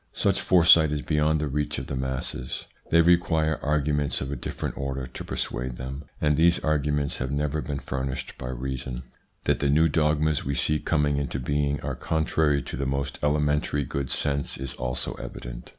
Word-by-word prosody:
Such - - +1
foresight 80 -3 +6
is 75 -1 -2
beyond 75 0 +2
the 75 - -1
reach 75 +2 -1
of - - -4
the 70 - -4
masses. 65 -1 -4 0.2
They 85 - +6
require 80 -3 +3
arguments 75 -1 +1
of 65 +1 -4
a - - -1
different - - -4
order 70 -1 -3
to 65 - -8
per - - -5
suade 65 0 -3
them, 65 +3 -6
and 75 -1 +3
these 85 +3 +5
arguments 75 -2 0
have 65 - -2
never 75 +2 -1
been 70 -1 -3
furnished 65 -1 -4
by 60 - -5
reason. 65 0 -4 0.4
That - - +1
the 70 - +1
new 80 +3 +5
dogmas 75 -1 +2
we 70 +1 -2
see 75 +2 +2
coming 75 -2 +1
into 70 -1 -2
being 70 +2 0
are - - -3
contrary 80 -3 +1
to - - -6
the 70 +1 -2
most 70 +1 -2
elementary 75 0 +1
good 70 +1 -3
sense 70 -1 -1
is 65 -1 -5
also 65 0 -3
evident. - - -8
70 Hz, 185 wpm, -26 LUFS, 65-75 Hz, 0.4 s, foresight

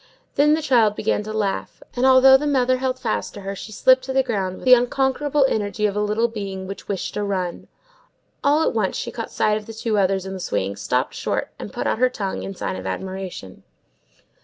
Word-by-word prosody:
Then 300 +2 +4
the 315 - -3
child 230 -7 +3
began - - 0
to 215 +1 -6
laugh; 210 -3 -3
and 250 +2 +2
although 265 0 +8
the 295 +3 +2
mother 255 -2 +2
held 260 0 -1
fast 235 -4 -3
to 205 - -8
her, 195 0 -5
she 215 - -9
slipped 255 +5 +4
to 265 - -3
the 265 0 +3
ground 195 -7 -2
with - - -11
the 255 - +8
unconquerable 265 +3 +2
energy 210 -2 -1
of 205 -1 0
a 210 - 0
little 210 +3 +1
being 200 -4 -6
which 195 +1 -8
wished 195 -3 -3
to 210 - -2
run. 185 -3 -3 0.8
All 295 +3 +3
at - - +1
once 215 -4 0
she - - -4
caught 230 -2 -5
sight 210 0 +1
of 215 - -9
the 225 - -8
two 220 -1 0
others 190 -1 +1
in 190 - -5
the 190 - -6
swing, 100 - -2
stopped 125 +5 -1
short, - - -2
and - - -7
put - - -4
out - - 0
her 255 0 +4
tongue, 200 -6 -4
in 195 - -6
sign 185 - -4
of - - -6
admiration. 185 - -6
215 Hz, 230 wpm, -22 LUFS, 195-255 Hz, 0.8 s, although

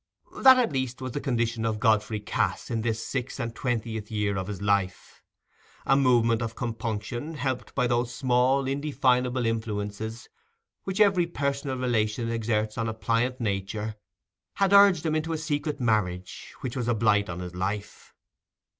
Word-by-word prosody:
That, 260 -1 +9
at 245 -8 +2
least, 130 -2 -2
was 130 -1 -5
the 145 - -4
condition 115 -4 -1
of 110 -1 -1
Godfrey 110 -1 +2
Cass 105 - -2
in 115 -1 0
this 110 -1 -2
six 130 0 -4
and 115 -2 -3
twentieth 115 -3 -3
year 105 -2 -1
of 95 -1 -3
his 105 -3 -5
life. 100 -2 -1 0.6
A 135 - +4
movement 120 -4 +3
of 115 -1 -3
compunction, 120 +5 -4
helped 130 -3 -3
by 125 - +2
those 120 0 0
small 130 +2 +2
indefinable 130 -3 +1
influences 110 0 -3 0.6
which 190 +1 -3
every 195 -5 +4
personal 140 -4 -2
relation 115 -2 0
exerts 110 -1 -1
on 115 0 0
a 110 - -4
pliant 115 +3 0
nature, 105 0 -2 0.6
had 195 0 +2
urged 200 -5 +6
him 155 - +1
into 155 +1 -1
a - - -1
secret 150 -1 -2
marriage, 100 -7 -1
which 125 - -4
was 125 -3 -2
a 120 - +2
blight 105 -2 +2
on 85 - -4
his 90 -1 -6
life. 100 +3 -5
115 Hz, 165 wpm, -27 LUFS, 110-135 Hz, 0.6 s, That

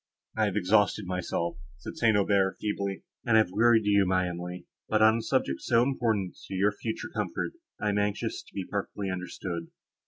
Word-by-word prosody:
I 110 - +2
have 100 -2 -1
exhausted 105 +1 +3
myself," 90 -2 -2 0.2
said 75 - -8
St. 110 -3 +3
Aubert, 100 -1 +2
feebly, 100 -2 -2 0.2
"and 110 -2 +4
have 110 -5 +3
wearied 110 +2 +4
you, 100 -1 +4
my 95 0 +2
Emily; 90 +1 -6 0.2
but, 110 0 +3
on 110 +1 +6
a - - -2
subject 130 +3 0
so 115 -1 +3
important 115 -8 0
to 95 - -5
your 100 +3 +3
future 110 +2 -5
comfort, - - -2 0.3
I 105 - 0
am 105 0 +1
anxious 105 0 -1
to - - -21
be 95 - -3
perfectly 100 -1 -3
understood." 90 -2 -5
100 Hz, 185 wpm, -28 LUFS, 95-110 Hz, 0.3 s, on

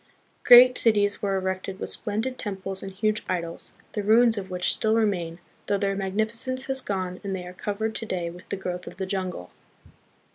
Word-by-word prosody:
Great 250 +1 +9
cities 205 -3 +2
were 195 -1 0
erected 190 0 -3
with - - -4
splendid 225 +4 -3
temples 195 -2 -4
and 195 - -6
huge 215 +2 0
idols, 170 -2 -4 0.2
the 210 - -2
ruins 225 +3 +5
of 195 -2 -5
which 180 0 +2
still 220 0 +1
remain, 180 -7 0 0.3
though 200 - +2
their 195 0 0
magnificence 220 +7 -1
has 265 -1 -1
gone 185 -5 -3
and 195 -1 -2
they 180 -1 -6
are 180 - -9
covered 215 +3 -3
to 225 - -5
day 175 -4 -2
with 175 +2 -10
the 200 - -2
growth 180 -1 -5
of - - -9
the 190 - -2
jungle. 185 - -4
200 Hz, 190 wpm, -26 LUFS, 185-220 Hz, 0.3 s, Great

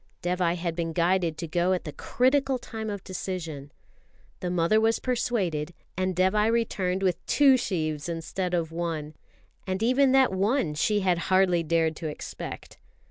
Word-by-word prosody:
Dévai 175 -1 +1
had 170 -1 -3
been 165 -1 -2
guided 170 -1 +1
to 170 - -4
go 175 +3 +1
at 180 - -2
the 150 - -6
critical 265 +1 +1
time 220 -2 -6
of 200 -2 -5
decision. 165 -7 -5 0.7
The 180 - -3
mother 180 +5 +2
was 225 0 +3
persuaded, 185 -11 -1 0.2
and 185 0 -1
Dévai 210 +4 +3
returned 195 -5 0
with 180 -1 0
two 280 -2 +5
sheaves 160 - -2
instead 175 +2 -2
of 165 -2 -1
one 165 -3 -3 0.5
and 190 +3 -1
even 260 +3 +4
that 265 -6 +4
one 195 - +1
she 205 +7 +1
had 180 -2 +2
hardly 185 -2 +4
dared 160 0 +1
to 160 - -4
expect. 150 - -7
180 Hz, 160 wpm, -27 LUFS, 165-215 Hz, 0.7 s, two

